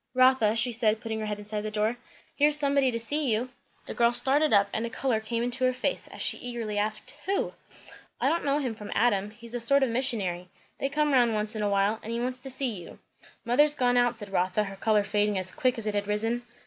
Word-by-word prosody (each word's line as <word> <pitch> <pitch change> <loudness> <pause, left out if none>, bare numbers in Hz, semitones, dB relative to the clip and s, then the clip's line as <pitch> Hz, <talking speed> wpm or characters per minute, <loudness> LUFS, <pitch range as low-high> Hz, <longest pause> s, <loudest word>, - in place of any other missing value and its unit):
"Rotha," 255 -4 +4
she 230 +2 +2
said 220 -2 +2
putting 220 -1 -4
her 215 - -3
head 210 -1 -3
inside 210 0 -4
the 215 - -4
door, 215 +2 0 0.4
"here's 295 +1 +5
somebody 280 -2 +2
to 230 -2 -2
see 285 +3 -1
you." 230 +4 -1 0.4
The - - -6
girl 235 0 +3
started 285 +5 +1
up 200 -1 +5
and 220 - -1
a 235 - -3
colour 235 -1 -1
came 230 +2 -3
into 245 +2 -3
her 255 0 +3
face, - - -2
as - - -7
she - - 0
eagerly 230 -4 -4
asked, 215 +1 -2
"Who?" 395 +1 0 0.7
"I - - +1
don't 335 - +1
know 280 0 +1
him 260 -6 -2
from 210 -1 -9
Adam. 205 -4 +2
He's 230 +2 -10
a 245 - -2
sort 275 +4 +4
of 265 - +1
a - - -4
missionary; 205 -9 -1 0.3
they 275 - -1
come 300 0 +1
round 240 -4 +4
once 210 +1 +1
in 215 - -3
a 205 - +1
while; 200 +2 +1
and 225 - -7
he 235 - -2
wants 250 +1 -2
to 270 - -6
see 265 -1 -1
you." 170 - -12 0.5
"Mother's 290 +5 +3
gone 245 -2 +2
out," 245 -1 +2
said 205 -3 -6
Rotha, 185 +2 +1
her 195 -1 -7
colour 210 +1 +2
fading 205 0 0
as 185 0 -1
quick 255 -4 0
as 225 - -1
it 210 - -1
had 205 0 -2
risen. 225 +3 -1
230 Hz, 250 wpm, -27 LUFS, 210-255 Hz, 0.7 s, here's